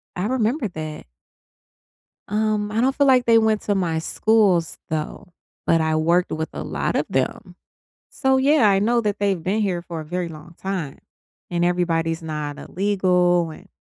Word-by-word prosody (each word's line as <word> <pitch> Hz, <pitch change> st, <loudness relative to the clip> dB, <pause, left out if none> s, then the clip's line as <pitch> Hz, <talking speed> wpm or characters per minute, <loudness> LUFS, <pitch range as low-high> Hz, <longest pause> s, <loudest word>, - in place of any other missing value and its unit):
I 180 Hz, +1 st, -2 dB
remember 245 Hz, +1 st, 0 dB
that. 155 Hz, -3 st, -7 dB, 1.2 s
Um, 210 Hz, 0 st, 0 dB
I 220 Hz, -, -1 dB
don't 265 Hz, +2 st, +2 dB
feel 285 Hz, -, +3 dB
like 255 Hz, -2 st, +5 dB
they 230 Hz, -1 st, +5 dB
went 220 Hz, -1 st, +2 dB
to 205 Hz, -, 0 dB
my 170 Hz, -4 st, 0 dB
schools, 195 Hz, -3 st, +2 dB
though, 160 Hz, +3 st, -5 dB, 0.3 s
but 165 Hz, -1 st, +3 dB
I 160 Hz, 0 st, +1 dB
worked 170 Hz, +3 st, +2 dB
with 160 Hz, 0 st, -3 dB
a -, -, -5 dB
lot -, -, -2 dB
of -, -, +1 dB
them. -, -, -2 dB, 0.5 s
So, 265 Hz, -1 st, +1 dB
yeah, 270 Hz, -4 st, +4 dB
I 195 Hz, -1 st, +3 dB
know 235 Hz, +3 st, +2 dB
that 210 Hz, -2 st, -1 dB
they've 195 Hz, -4 st, 0 dB
been 200 Hz, +5 st, 0 dB
here 180 Hz, -4 st, -1 dB
for 170 Hz, -2 st, -6 dB
a 155 Hz, -, -9 dB
very 180 Hz, +2 st, -3 dB
long 160 Hz, +2 st, -12 dB
time, 185 Hz, -8 st, -4 dB, 0.5 s
and 175 Hz, -1 st, 0 dB
everybody's 165 Hz, -2 st, 0 dB
not 150 Hz, -2 st, -5 dB
illegal, 180 Hz, -3 st, +1 dB
and -, -, -13 dB
180 Hz, 175 wpm, -22 LUFS, 165-215 Hz, 1.2 s, like